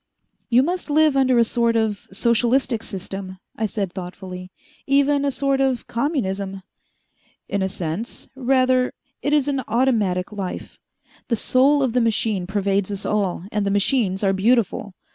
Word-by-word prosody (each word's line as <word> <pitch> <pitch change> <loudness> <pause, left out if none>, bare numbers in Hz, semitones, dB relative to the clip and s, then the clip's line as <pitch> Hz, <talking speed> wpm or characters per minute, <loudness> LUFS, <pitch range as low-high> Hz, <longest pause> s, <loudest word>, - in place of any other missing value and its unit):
"You 245 +2 +5
must 355 +2 -2
live 305 -1 +4
under 260 -2 +3
a 235 - +6
sort 230 0 +1
of 220 -3 -1
socialistic 235 +3 +1
system," 195 -2 -6 0.2
I 220 - -1
said 195 -3 -3
thoughtfully. 185 0 -7 0.4
"Even 280 +1 +3
a 285 - +2
sort 275 0 0
of 265 -2 0
communism?" 200 - -2 0.8
"In 200 - -1
a 190 - 0
sense. 185 +5 -5
Rather 255 -1 +2 0.3
it 290 - -1
is 295 -2 +3
an 275 -2 0
automatic 215 -7 +1
life. 195 -3 -6 0.5
The 235 - +1
soul 270 +5 +3
of 250 -4 0
the 250 - +3
machine 220 -5 0
pervades 200 0 0
us 200 -1 -5
all, 200 -5 0
and 210 -1 0
the 200 - 0
machines 200 -1 +1
are 195 -1 +3
beautiful. 205 -1 +1
225 Hz, 155 wpm, -22 LUFS, 195-260 Hz, 0.8 s, a